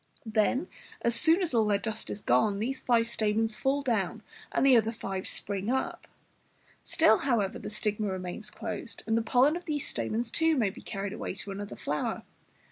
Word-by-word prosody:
Then, 225 +8 +1 0.4
as 235 - +2
soon 325 - +7
as 330 - -1
all 225 -2 +3
their 205 -1 +3
dust 220 +2 -4
is 205 - -5
gone, 200 - +2
these 260 +6 -2
five 235 -2 +2
stamens 220 -1 0
fall 275 +4 0
down, 220 -3 -1 0.3
and - - +2
the 265 -2 +7
other 225 -1 +3
five 195 -4 -5
spring 200 +1 -2
up. 265 +1 -2 0.8
Still, 270 -9 +4
however, 230 -8 0
the - - -6
stigma 210 0 -2
remains 185 +3 -5
closed, 220 +1 -6
and 225 - +1
the 230 - +2
pollen 255 +7 +3
of 350 - -6
these 295 -3 -2
stamens, 225 +1 -2
too, 320 +1 +2
may 215 -6 +2
be - - -12
carried 195 0 -4
away - - -5
to 200 - -7
another 205 +1 -6
flower. 150 +1 -3
220 Hz, 190 wpm, -29 LUFS, 205-250 Hz, 0.8 s, soon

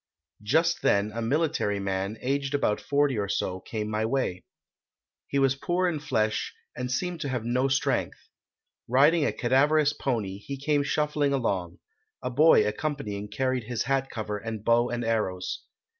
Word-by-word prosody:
"Just 160 +10 +2
then 100 +1 +2
a 115 - -3
military 135 -5 0
man, 100 +2 -2
aged 140 +2 -1
about 105 -7 +1
forty 140 -4 +1
or 100 -1 -2
so, 95 -2 -1
came 105 +2 -4
my 110 0 -1
way. 115 -6 -1 0.8
He 140 - -1
was 135 -1 +4
poor 175 +6 0
in 165 -4 -1
flesh 110 -8 -1 0.2
and 125 0 -3
seemed 175 +4 -2
to 140 - -2
have 125 -3 -2
no 125 +3 +1
strength. 135 0 0 0.7
Riding 145 +6 +4
a - - +1
cadaverous 145 +4 +3
pony, 105 -10 -2
he 140 +7 -6
came 145 +1 +1
shuffling 150 0 0
along; 95 -9 -1 0.5
a 125 - -2
boy 145 -4 +6
accompanying 105 -4 -3
carried 130 +2 -1
his 115 -1 -2
hat 135 0 0
cover 105 -2 -4
and 110 -1 -6
bow 120 +1 +3
and 120 -1 -2
arrows. 100 -5 -2
125 Hz, 160 wpm, -27 LUFS, 105-140 Hz, 0.8 s, boy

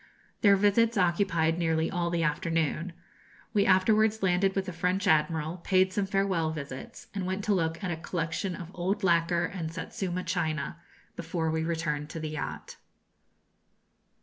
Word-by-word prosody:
Their 200 -2 +6
visits 210 +3 +3
occupied 170 -3 +2
nearly 160 -1 +1
all 175 -2 0
the 170 -1 0
afternoon. 165 +2 0 0.6
We 205 -2 +3
afterwards 215 +3 +3
landed 190 +1 +2
with 195 -1 0
the 185 - -5
French 180 +3 0
admiral, 160 +1 +2
paid 185 +1 +2
some 200 -2 0
farewell 190 -5 +1
visits, 140 -4 -7
and 195 -2 -3
went 190 +2 -2
to 210 - +2
look 165 0 -1
at 185 - -1
a 165 - -2
collection 170 +2 -3
of 170 0 -8
old 185 +4 -2
lacquer 170 -1 +3
and 165 -4 -4
Satsuma 180 +2 -4
china, 160 -4 -2 0.4
before 165 -1 -2
we 160 0 0
returned 155 -3 -2
to 165 - -6
the 155 -1 -4
yacht. 155 -1 -6
175 Hz, 155 wpm, -29 LUFS, 160-190 Hz, 0.6 s, Their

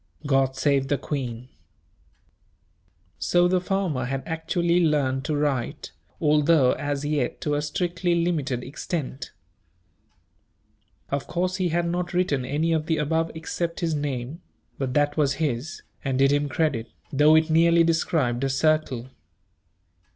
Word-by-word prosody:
God 135 -2 +2
save 135 -1 +1
the 145 - +1
queen." 125 -3 -5 1.7
So 175 0 +3
the 180 0 +1
farmer 180 -9 -1
had 135 +1 -3
actually 170 +2 0
learned 135 -4 +1
to 155 - -1
write, 140 -5 -2 0.3
although 150 -3 +4
as 145 -1 -2
yet 145 -4 -1
to 150 - -1
a 145 - +1
strictly 175 +3 -1
limited 155 -8 -1
extent. 140 -1 -5 1.8
Of 140 0 -2
course 180 +1 -1
he 185 -2 0
had 170 +1 0
not 175 +1 -2
written 145 -8 +1
any 155 +5 0
of 160 -1 -1
the 160 - +1
above 160 +2 0
except 170 +2 -4
his 165 -2 0
name; 145 +1 -3 0.4
but 130 -2 -2
that 145 0 +2
was 140 -3 +2
his, 145 0 -3 0.2
and 135 -2 -1
did 135 +1 +4
him 145 0 +1
credit, 130 -6 -1 0.2
though 150 +3 +6
it 160 0 +3
nearly 170 +1 +5
described 155 -7 +1
a 135 - +1
circle. 135 -3 0
150 Hz, 140 wpm, -25 LUFS, 135-165 Hz, 1.8 s, though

